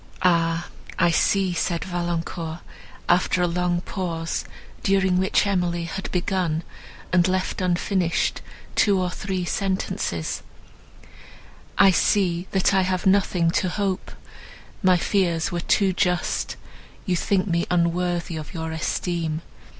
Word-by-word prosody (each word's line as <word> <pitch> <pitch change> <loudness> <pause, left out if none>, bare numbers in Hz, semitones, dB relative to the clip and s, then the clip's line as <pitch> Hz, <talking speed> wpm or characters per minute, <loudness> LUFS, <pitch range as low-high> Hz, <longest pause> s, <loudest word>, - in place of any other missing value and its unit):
"Ah! 170 -1 +2 0.3
I 170 - +4
see," 190 +3 +2
said 170 0 -1
Valancourt, 170 -2 -3 0.5
after 180 0 +3
a - - +3
long 175 0 0
pause, 165 -4 -3 0.4
during 190 -2 +2
which 190 +2 +2
Emily 175 -3 0
had 190 +3 -5
begun, 175 -3 0 0.5
and 180 0 +5
left 185 +1 -1
unfinished 180 0 0 0.3
two 200 -3 +3
or 180 -1 -1
three 185 -1 -3
sentences, 190 - -2 1.4
"I 195 -1 +7
see 180 -1 +2
that 190 0 +2
I 190 - +4
have 185 -1 -1
nothing 185 -3 +3
to 185 - +1
hope; 195 0 -2 0.7
my 185 -3 +5
fears 170 -3 +1
were 175 - -1
too 190 +2 +2
just, 180 -1 0 0.5
you 185 -4 +1
think 185 +1 +1
me 170 -3 0
unworthy 175 -1 0
of 155 +3 -8
your 160 -1 -3
esteem. 160 0 -2
180 Hz, 125 wpm, -24 LUFS, 170-190 Hz, 1.4 s, I